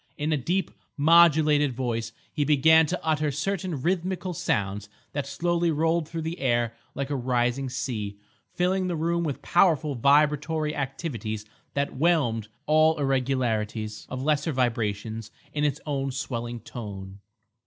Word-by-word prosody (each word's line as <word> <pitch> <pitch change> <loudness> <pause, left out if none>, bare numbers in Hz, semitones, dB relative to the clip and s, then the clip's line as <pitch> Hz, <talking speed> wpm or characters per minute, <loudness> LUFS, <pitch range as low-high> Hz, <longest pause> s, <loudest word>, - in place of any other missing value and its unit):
In 150 +1 -1
a - - +3
deep, 175 +8 -1 0.3
modulated 150 -2 +5
voice 115 -2 -2 0.2
he 150 - +1
began 155 +2 +5
to 180 +4 -2
utter 155 -1 +1
certain 165 0 -2
rhythmical 185 +1 -1
sounds 105 - -1 0.2
that 140 -1 -3
slowly 170 +3 0
rolled 160 +1 +1
through 165 -1 -4
the 165 +2 -4
air 120 -3 +1 0.2
like 140 +1 -3
a - - +1
rising 125 +1 0
sea, 110 -6 -4 0.4
filling 185 +1 +1
the 175 - -1
room 170 +2 0
with 145 -5 -3
powerful 160 -5 +3
vibratory 150 +4 +2
activities 130 - -4 0.3
that 140 0 -1
whelmed 135 -9 +2 0.2
all 155 +1 +4
irregularities 120 -6 -1
of 130 0 -4
lesser 150 +2 +1
vibrations 115 -3 -1 0.2
in 150 - -1
its 145 0 +1
own 140 -2 -1
swelling 120 -3 -4
tone. 100 -4 -8
140 Hz, 140 wpm, -26 LUFS, 120-160 Hz, 0.4 s, modulated